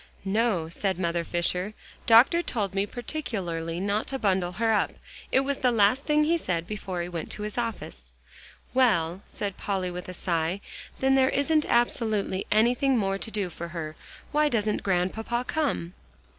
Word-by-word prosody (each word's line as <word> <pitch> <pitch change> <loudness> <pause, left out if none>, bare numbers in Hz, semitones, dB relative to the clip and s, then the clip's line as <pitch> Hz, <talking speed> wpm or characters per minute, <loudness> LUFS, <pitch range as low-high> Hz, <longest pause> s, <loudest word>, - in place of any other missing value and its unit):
"No," 195 -4 +1
said 190 +2 -2
Mother 170 -2 0
Fisher. 180 +4 0 0.3
"Doctor 245 +9 +7
told 205 - -2
me 195 +1 0
particularly 190 - -3
not 200 +3 0
to 270 - -2
bundle 190 -6 +1
her 225 +3 +1
up. 210 - +1 0.4
It 265 - +5
was 275 0 -2
the 255 - +3
last 225 +4 +3
thing 300 0 +3
he 335 +2 +2
said 170 - -2
before 190 -3 -4
he - - -4
went 170 -3 -5
to 210 - -6
his 210 0 -4
office." 205 - -4 0.6
"Well," 190 -9 +2
said 200 -2 -4
Polly 190 -3 -2
with 180 +1 -7
a 185 - -6
sigh, 170 +1 -1 0.4
"then 265 0 +2
there 265 -1 +4
isn't 305 +2 +2
absolutely 220 -5 +1
anything 245 +5 +3
more 195 -2 0
to - - -5
do 205 -4 -2
for 170 +1 -6
her. 165 -2 -6 0.4
Why 300 0 +3
doesn't 215 -4 0
Grandpapa 215 +6 -1
come?" 275 - -1
205 Hz, 170 wpm, -27 LUFS, 180-240 Hz, 0.6 s, Doctor